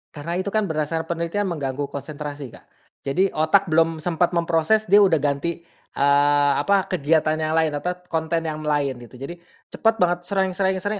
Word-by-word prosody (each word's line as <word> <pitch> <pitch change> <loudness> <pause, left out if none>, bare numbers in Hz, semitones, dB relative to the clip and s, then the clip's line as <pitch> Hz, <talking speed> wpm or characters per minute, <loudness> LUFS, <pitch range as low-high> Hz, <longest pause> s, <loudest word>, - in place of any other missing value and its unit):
Karena 160 +4 -4
itu 185 +2 -2
kan 215 -1 0
berdasarkan 160 +1 -2
penelitian 170 +4 -2
mengganggu 145 -4 -3
konsentrasi, 145 -1 -7
Kak. - - -17 0.3
Jadi, 185 +8 0
otak 160 +6 +2
belum 165 0 +3
sempat 175 0 0
memproses, 170 +6 +2
dia 205 - +8
udah 185 -5 +4
ganti, 150 +4 -2 0.3
eee, 145 0 +3
apa, 195 +5 +2
kegiatan 155 -2 +2
yang 155 0 -1
lain, 160 -1 +2
atau 180 +5 -2 0.2
konten 165 0 -1
yang 155 -1 -4
lain, 145 -4 -1
gitu. 120 +1 -13
Jadi, 155 +7 -8 0.3
cepet 225 0 +1
banget, 175 -3 +2
sreng 190 -1 0
sreng 190 0 0
sreng, 205 0 -2
165 Hz, 175 wpm, -22 LUFS, 145-180 Hz, 0.3 s, dia